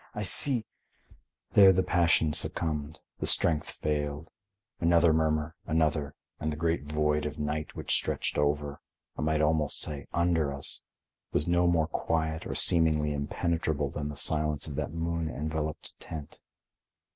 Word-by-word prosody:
I 105 Hz, -, -2 dB
see—" 125 Hz, +3 st, +1 dB, 0.9 s
There 100 Hz, -2 st, +8 dB
the 95 Hz, 0 st, +2 dB
passion 85 Hz, -3 st, +3 dB
succumbed, 75 Hz, -1 st, -2 dB, 0.2 s
the -, -, -2 dB
strength 80 Hz, -3 st, +3 dB
failed; 75 Hz, +1 st, -3 dB, 0.5 s
another 85 Hz, -1 st, +4 dB
murmur, 80 Hz, 0 st, +1 dB
another, 75 Hz, -2 st, 0 dB, 0.2 s
and 80 Hz, -, -2 dB
the -, -, -3 dB
great 80 Hz, -1 st, 0 dB
void 75 Hz, 0 st, 0 dB
of 75 Hz, -, -7 dB
night 75 Hz, 0 st, -3 dB
which -, -, -1 dB
stretched -, -, 0 dB
over—I 75 Hz, 0 st, -3 dB
might 75 Hz, 0 st, +1 dB
almost 75 Hz, -1 st, +1 dB
say 75 Hz, -3 st, -5 dB
under 80 Hz, -5 st, +1 dB
us—was 70 Hz, +2 st, -6 dB
no 85 Hz, 0 st, +3 dB
more 85 Hz, -2 st, +3 dB
quiet 80 Hz, -1 st, -2 dB
or -, -, -4 dB
seemingly 80 Hz, -3 st, +4 dB
impenetrable 75 Hz, 0 st, -1 dB
than 75 Hz, 0 st, -4 dB
the 75 Hz, -, -7 dB
silence 75 Hz, -1 st, 0 dB
of 75 Hz, -, -6 dB
that -, -, -3 dB
moon 85 Hz, 0 st, -2 dB
enveloped 80 Hz, 0 st, -4 dB
tent. 75 Hz, -3 st, -8 dB
80 Hz, 140 wpm, -29 LUFS, 75-85 Hz, 0.9 s, There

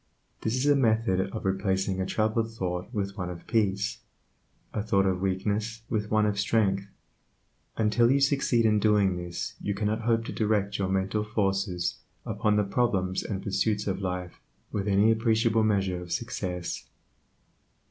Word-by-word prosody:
This 110 Hz, +2 st, 0 dB
is 130 Hz, +2 st, 0 dB
a 145 Hz, 0 st, +5 dB
method 110 Hz, -7 st, +2 dB
of 110 Hz, -, -6 dB
replacing 95 Hz, 0 st, 0 dB
a 95 Hz, -, -1 dB
troubled 110 Hz, +2 st, 0 dB
thought 90 Hz, -3 st, -4 dB
with 100 Hz, -4 st, -3 dB
one 90 Hz, -1 st, -2 dB
of 85 Hz, -1 st, -8 dB
peace, 105 Hz, -2 st, 0 dB, 0.7 s
a 105 Hz, -, -1 dB
thought 100 Hz, -2 st, +2 dB
of 95 Hz, -1 st, 0 dB
weakness 105 Hz, +4 st, -1 dB
with 105 Hz, -1 st, -1 dB
one 110 Hz, 0 st, +3 dB
of 105 Hz, -1 st, 0 dB
strength. 100 Hz, -2 st, +1 dB, 0.9 s
Until 110 Hz, +2 st, +3 dB
you 135 Hz, +2 st, +4 dB
succeed 135 Hz, -4 st, +2 dB
in 105 Hz, -1 st, +4 dB
doing 105 Hz, -3 st, +3 dB
this 90 Hz, -1 st, -5 dB
you 100 Hz, -, -2 dB
cannot 105 Hz, +2 st, -1 dB
hope 115 Hz, 0 st, +1 dB
to -, -, -5 dB
direct 105 Hz, -2 st, 0 dB
your 95 Hz, -1 st, 0 dB
mental 95 Hz, +2 st, 0 dB
forces 95 Hz, -4 st, -1 dB, 0.3 s
upon 105 Hz, 0 st, +1 dB
the 105 Hz, -, +3 dB
problems 95 Hz, -4 st, 0 dB
and 95 Hz, -2 st, -4 dB
pursuits 105 Hz, +1 st, 0 dB
of 100 Hz, 0 st, -2 dB
life 90 Hz, -2 st, -4 dB, 0.3 s
with 100 Hz, 0 st, -2 dB
any 100 Hz, +2 st, +4 dB
appreciable 115 Hz, 0 st, +2 dB
measure 95 Hz, -4 st, +1 dB
of 90 Hz, -1 st, -9 dB
success. 90 Hz, -6 st, -3 dB
105 Hz, 160 wpm, -28 LUFS, 95-110 Hz, 0.9 s, a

